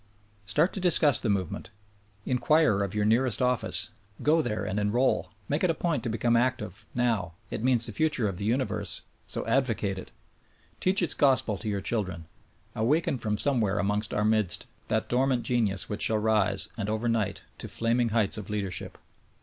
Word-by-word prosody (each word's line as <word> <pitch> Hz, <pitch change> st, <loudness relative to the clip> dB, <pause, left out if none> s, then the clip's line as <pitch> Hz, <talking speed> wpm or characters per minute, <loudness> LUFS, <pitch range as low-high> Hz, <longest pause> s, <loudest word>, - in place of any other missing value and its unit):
Start 150 Hz, -, +1 dB
to -, -, -3 dB
discuss 165 Hz, -6 st, +5 dB
the 110 Hz, -, -2 dB
movement. 95 Hz, -4 st, -2 dB, 0.6 s
Inquire 130 Hz, -3 st, +2 dB
of 100 Hz, 0 st, -2 dB
your 105 Hz, -1 st, +1 dB
nearest 115 Hz, +2 st, +2 dB
office. 125 Hz, -3 st, 0 dB, 0.3 s
Go 160 Hz, +2 st, +4 dB
there 110 Hz, -7 st, -3 dB
and 100 Hz, -, -2 dB
enroll. 110 Hz, +6 st, +1 dB, 0.2 s
Make 145 Hz, +5 st, -1 dB
it 185 Hz, -, +3 dB
a 165 Hz, -, +1 dB
point 155 Hz, -5 st, -1 dB
to 120 Hz, -, -3 dB
become 115 Hz, +1 st, +1 dB
active, 115 Hz, -6 st, -1 dB
now 115 Hz, -9 st, 0 dB
— 110 Hz, -, -33 dB
it -, -, -4 dB
means 125 Hz, -2 st, +5 dB
the -, -, -1 dB
future 155 Hz, -8 st, 0 dB
of 95 Hz, -3 st, -4 dB
the 100 Hz, -, -3 dB
universe; 125 Hz, +4 st, 0 dB, 0.2 s
so -, -, -2 dB
advocate 115 Hz, -5 st, 0 dB
it! -, -, -11 dB, 0.7 s
Teach 185 Hz, 0 st, +2 dB
its 175 Hz, -, +1 dB
gospel 130 Hz, -6 st, +3 dB
to 110 Hz, -, -4 dB
your 100 Hz, -1 st, -2 dB
children. 90 Hz, -7 st, -2 dB, 0.5 s
Awaken 135 Hz, +4 st, 0 dB
from 105 Hz, -2 st, -1 dB
somewhere 115 Hz, -7 st, +1 dB
amongst 105 Hz, +1 st, 0 dB
our 105 Hz, -, 0 dB
midst 110 Hz, -4 st, +2 dB, 0.2 s
that -, -, -1 dB
dormant 125 Hz, -1 st, +1 dB
genius 110 Hz, -6 st, +1 dB
which 105 Hz, -, -5 dB
shall 110 Hz, -, +4 dB
arise, 105 Hz, -3 st, +2 dB
and 105 Hz, -2 st, -3 dB
over 110 Hz, +2 st, -1 dB
night, 105 Hz, -5 st, -1 dB, 0.2 s
to -, -, -5 dB
flaming 115 Hz, +1 st, 0 dB
heights 110 Hz, -1 st, +2 dB
of 105 Hz, -, -9 dB
leadership. 100 Hz, -4 st, -3 dB
115 Hz, 180 wpm, -27 LUFS, 105-130 Hz, 0.7 s, discuss